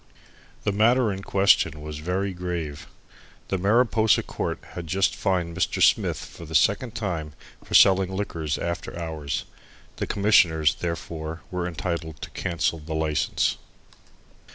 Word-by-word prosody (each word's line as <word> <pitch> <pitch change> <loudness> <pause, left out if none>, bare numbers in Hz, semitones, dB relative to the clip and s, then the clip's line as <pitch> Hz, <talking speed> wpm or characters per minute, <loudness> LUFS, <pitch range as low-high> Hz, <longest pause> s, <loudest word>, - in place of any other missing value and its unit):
The 105 - +1
matter 115 +2 +3
in 95 - -6
question 95 -6 +3
was 75 0 -7
very 95 +4 -2
grave. 85 -5 -5 0.6
The 95 - 0
Mariposa 110 +2 +3
Court - - -3
had 85 -2 -7
just 95 +4 +1
fined 90 -4 -1
Mr. - - 0
Smith - - +4
for - - -10
the - - -6
second 125 -2 +2
time 85 -9 -3 0.3
for - - -3
selling 95 -1 +6
liquors 85 -7 -2
after 85 0 -4
hours. 80 -4 -3 0.5
The - - -2
Commissioners, 85 -7 +4
therefore, 80 -1 -5
were 90 -1 -2
entitled 80 -2 -4
to - - -7
cancel 85 -1 -1
the 80 +1 -6
license. 80 -2 0
85 Hz, 135 wpm, -25 LUFS, 80-100 Hz, 0.6 s, selling